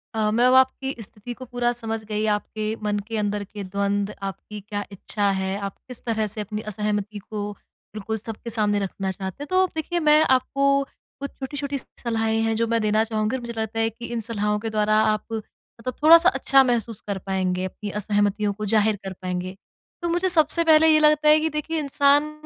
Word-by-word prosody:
अ, 215 -1 +1
मैं 235 +3 +3
अब 255 - +4
आपकी 265 +1 0
स्थिति 215 +3 -8
को 255 - -7
पूरा 245 -1 0
समझ 225 -1 -4
गई। 215 0 -2
आपके 215 +1 -4
मन 205 -1 0
के 225 -1 -3
अंदर 205 -1 -1
के 205 +1 -8
द्वंद्व, 200 +1 -1 0.2
आपकी 210 +2 -9
क्या 205 +1 -4
इच्छा 200 +1 -1
है, 190 +1 -2
आप 200 -1 -5
किस 250 -2 -7
तरह 220 -2 0
से 215 +1 -3
अपनी 210 +1 -4
असहमति 210 0 -2
को 210 -1 -3 0.4
बिल्कुल 215 +1 -3
सबके 225 +2 -7
सामने 210 -2 +2
रखना 195 -1 -3
चाहते 190 +7 -6
हैं। - - -8
तो 370 0 +4
देखिए 335 +2 -1
मैं 305 -1 +5 0.2
आपको 275 +2 -3 0.6
कुछ 280 0 -4
छोटी-छोटी 280 +1 -3 0.2
सलाहें 225 -1 0
हैं 225 0 +1
जो 230 +1 +1
मैं 230 0 +1
देना 215 +1 +2
चाहूँगी 220 +1 -1
और 260 - -4
मुझे 235 0 -6
लगता 220 0 -2
है 225 0 +2
कि 230 +2 -10
इन 235 - -1
सलाहों 210 -1 0
के 225 +1 -4
द्वारा 215 0 +1
आप 215 -1 +1
मतलब 230 +2 -7
थोड़ा-सा 335 +3 +8
अच्छा 275 -7 +4
महसूस 235 -4 -1
कर 200 -1 -2
पाएँगे, 185 -1 -1
अपनी 205 +2 -6
असहमतियों 205 0 +1
को 215 +1 -5
ज़ाहिर 215 0 +3
कर 190 -1 -5
पाएँगे। 185 0 -3 0.5
तो 345 - -1
मुझे 350 +2 +1
सबसे 335 0 +3
पहले 320 -1 +6
ये 310 -1 +6
लगता 300 0 +4
है 305 +1 +7
कि 320 +1 0
देखिए 315 +1 -2
इंसान 285 +1 +3
220 Hz, 205 wpm, -24 LUFS, 205-260 Hz, 0.6 s, थोड़ा-सा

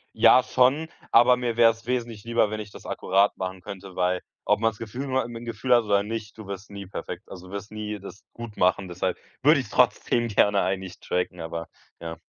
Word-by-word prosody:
Ja 115 +3 +7
schon, 130 +6 +2 0.2
aber 125 +1 +6
mir 120 -2 -2
wär's 115 0 +4
wesentlich 115 -4 -2
lieber, 115 -2 +1
wenn 110 - -3
ich 105 -1 -7
das - - -13
akkurat 100 +2 +2
machen 95 0 -4
könnte, 95 0 -9
weil 90 0 +1 0.2
ob - - +3
man's 115 -2 +1
Gefühl 120 +5 -5
nur 130 -1 +1
im 120 -1 -8
im 115 - -7
Gefühl 115 +2 0
hat 120 -2 +4
oder 100 -1 +3
nicht, 110 0 -6
du 110 - -9
wirst 100 +1 -7
nie 100 -1 -8
perfekt. 95 - -7
Also 90 0 -9
du 95 - -12
wirst 100 +1 -6
nie 105 -1 -4
das 95 +1 -11
gut 115 -3 -9
machen, 95 +1 +2
deshalb 90 +1 -2 0.2
würde - - +6
ich's - - -6
trotzdem 120 -1 +2
gerne 100 -1 +3
eigentlich 95 -1 -3
tracken, 90 0 -2
aber 85 0 -5 0.3
ja. 85 0 -6
105 Hz, 215 wpm, -25 LUFS, 95-115 Hz, 0.3 s, Ja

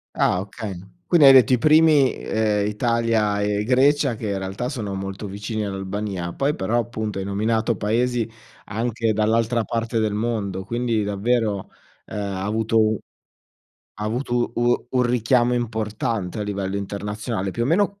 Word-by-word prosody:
Ah, 90 - +2
okay. 100 -2 -7 0.3
Quindi 170 -5 +5
hai 135 - +10
detto 130 -1 +6
i - - +5
primi, 155 -1 +5
ehm, 105 -2 0
Italia 110 -2 +1
e 105 0 0
Grecia 135 +2 +3
che 110 -1 -5
in 100 - -1
realtà 95 +6 -4
sono 105 -8 -4
molto 95 +2 -5
vicini 105 +2 -4
all'Albania, 95 -2 -4
poi 140 +2 0
però 110 +5 -1
appunto 110 -3 -3
hai 95 - -3
nominato 110 +3 0
paesi 115 +3 0 0.4
anche 115 +1 -1
dall'altra 115 +2 +1
parte 115 +1 -2
del 110 -2 +1
mondo, 105 -4 -2
quindi 120 -1 0
davvero, 105 0 -1 0.3
ehm, - - -9
ha 100 -2 -3
avuto 110 +2 +1
u 110 -1 +2 1.0
ha 105 - -3
avuto 120 +2 -1
u 120 0 +1
un 125 -1 +2
richiamo 120 0 +2
importante 110 -3 -2
a - - 0
livello 100 -1 -3
internazionale. 100 0 -4
Più 115 - -2
o - - +1
meno, 200 +6 +1
110 Hz, 155 wpm, -22 LUFS, 100-120 Hz, 1.0 s, hai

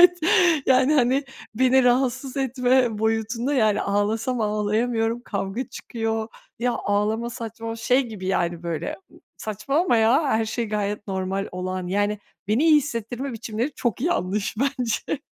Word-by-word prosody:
Evet, 355 0 +7 0.5
yani 260 +3 +4
hani 265 +1 +3 0.3
beni 260 +2 +4
rahatsız 250 +1 +1
etme 255 -3 +2
boyutunda 225 +4 0
yani 215 -5 +3
ağlasam 220 +5 0
ağlayamıyorum, 225 +2 0
kavga 200 +4 -3
çıkıyor. 225 -1 -3 0.3
Ya, 245 +1 +1
ağlama 215 +3 0
saçma 225 0 -6
Şey 250 +4 +2
gibi 210 -5 -7
yani 175 -2 0
böyle, 170 -1 -3 0.4
saçmalama 275 - 0
ya, 230 +7 +4
her 225 -3 +2
şey 230 +2 -2
gayet 205 0 -2
normal 190 0 -2
olan 185 0 -3
yani 205 +2 0 0.3
beni 225 +9 +2
iyi 320 -2 +7
hissettirme 255 -1 -2
biçimleri 230 +4 -3
çok 235 -3 -2
yanlış 210 - -1
bence. 270 0 -1
225 Hz, 135 wpm, -24 LUFS, 210-255 Hz, 0.5 s, Evet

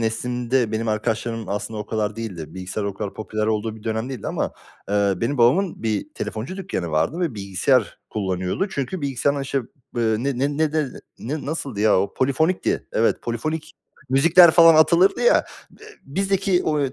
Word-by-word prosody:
neslimde, 120 +1 0
benim 110 +1 -1
arkadaşlarım 115 +1 -2
aslında 105 +2 -3
o 105 - -6
kadar 105 -1 -2
değildir. 95 -9 -6
Bilgisayar 95 +3 -4
o 100 -1 -3
kadar 100 0 -5
popüler 110 0 -3
olduğu 110 0 -1
bir 110 - -14
dönem 110 +2 -2
değildi 125 -7 -6
ama, - - -2 0.4
eee, 100 -1 +2
benim 120 +8 -2
babamın 160 - +3
bir 110 - -1
telefoncu 115 +12 -5
dükkanı 175 - -4
vardı 80 - 0
ve 165 -9 -1
bilgisayar 100 +4 +1
kullanıyordu. 95 - -2
Çünkü 150 +1 -4
bilgisayardan 140 +1 0
işte, 135 0 -1 0.4
eee, 115 -2 +2
ne 135 0 -2
ne 140 +2 0
ne 155 -1 +1
de 155 -1 +1 0.3
ne 145 +6 -4
ne - - -8
nasıldı 140 -8 -4
ya 105 -3 +4
o? 100 - -3
Polifonikti. 160 +7 0
Evet, 115 - +1
polifonik 155 +7 -3 0.4
müzikler 165 +6 +7
falan 165 0 +7
atılırdı 170 +5 +4
ya. 485 +1 +4 0.4
Eee, 435 - -13 0.2
bizdeki 195 +3 +1
o, 150 -1 +1
eee, 135 -2 -1
120 Hz, 175 wpm, -22 LUFS, 110-155 Hz, 0.4 s, müzikler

